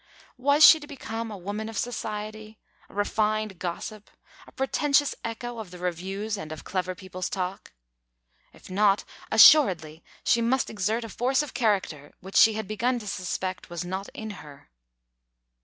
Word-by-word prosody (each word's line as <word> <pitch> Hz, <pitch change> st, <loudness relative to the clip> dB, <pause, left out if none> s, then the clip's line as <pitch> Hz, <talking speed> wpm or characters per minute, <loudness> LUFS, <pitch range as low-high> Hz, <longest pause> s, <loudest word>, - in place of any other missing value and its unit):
Was 285 Hz, +4 st, +6 dB
she 320 Hz, -, +9 dB
to 295 Hz, -, -11 dB
become 230 Hz, -5 st, -5 dB
a 210 Hz, -, -7 dB
woman 205 Hz, +4 st, -5 dB
of 225 Hz, -, -7 dB
society, 215 Hz, -2 st, -5 dB, 0.3 s
a -, -, -17 dB
refined 215 Hz, -1 st, 0 dB
gossip, 205 Hz, +4 st, -6 dB, 0.4 s
a -, -, -14 dB
pretentious 285 Hz, +1 st, +1 dB
echo 230 Hz, +1 st, -5 dB
of 215 Hz, -4 st, -7 dB
the 180 Hz, -, -11 dB
reviews 190 Hz, +4 st, -3 dB
and 155 Hz, 0 st, -7 dB
of 155 Hz, -, -7 dB
clever 185 Hz, -1 st, -3 dB
people's 185 Hz, 0 st, -6 dB
talk? 185 Hz, 0 st, -4 dB, 0.8 s
If -, -, -16 dB
not, 200 Hz, +1 st, +3 dB, 0.3 s
assuredly 185 Hz, -, +6 dB, 0.2 s
she 235 Hz, -, +3 dB
must 250 Hz, +3 st, +1 dB
exert 220 Hz, +3 st, -1 dB
a -, -, -6 dB
force 255 Hz, +6 st, +1 dB
of 295 Hz, -, -8 dB
character 190 Hz, -, -1 dB
which 190 Hz, +2 st, -11 dB
she 220 Hz, -, +7 dB
had 215 Hz, -2 st, -4 dB
begun 240 Hz, +4 st, 0 dB
to 225 Hz, -, -7 dB
suspect 185 Hz, -1 st, -4 dB
was 175 Hz, 0 st, -5 dB
not 190 Hz, +2 st, -4 dB
in 220 Hz, -1 st, -6 dB
her. 140 Hz, -, -15 dB
210 Hz, 160 wpm, -26 LUFS, 185-230 Hz, 0.8 s, she